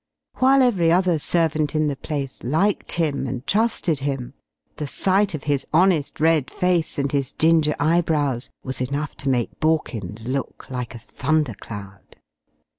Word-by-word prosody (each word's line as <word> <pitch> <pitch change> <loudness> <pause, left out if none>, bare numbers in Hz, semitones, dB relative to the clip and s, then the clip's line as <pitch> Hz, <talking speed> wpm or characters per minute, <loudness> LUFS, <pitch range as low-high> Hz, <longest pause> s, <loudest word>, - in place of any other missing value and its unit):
While 265 +1 +5
every 185 -10 +3
other 180 -2 +3
servant 155 -1 0
in 155 0 +2
the 145 -2 -1
place 140 -2 -5
liked 160 +11 +1
him 150 -5 0
and 125 +1 -5
trusted 205 -8 +1
him, 135 -2 -3 0.4
the 150 - -3
sight 195 +4 +1
of 145 - -7
his 140 -2 0
honest, 165 -3 +2
red 160 -3 +3
face 180 -3 +1
and 140 -1 0
his 140 -2 -1
ginger 160 -2 +3
eyebrows 150 -5 +1
was 130 -1 -4
enough 140 +3 -3
to 140 - -2
make 120 -3 -1
Borkins 120 - -1
look 135 +1 -4
like 125 -2 -4
a - - -5
thundercloud. 115 -7 -3
150 Hz, 150 wpm, -22 LUFS, 135-165 Hz, 0.4 s, While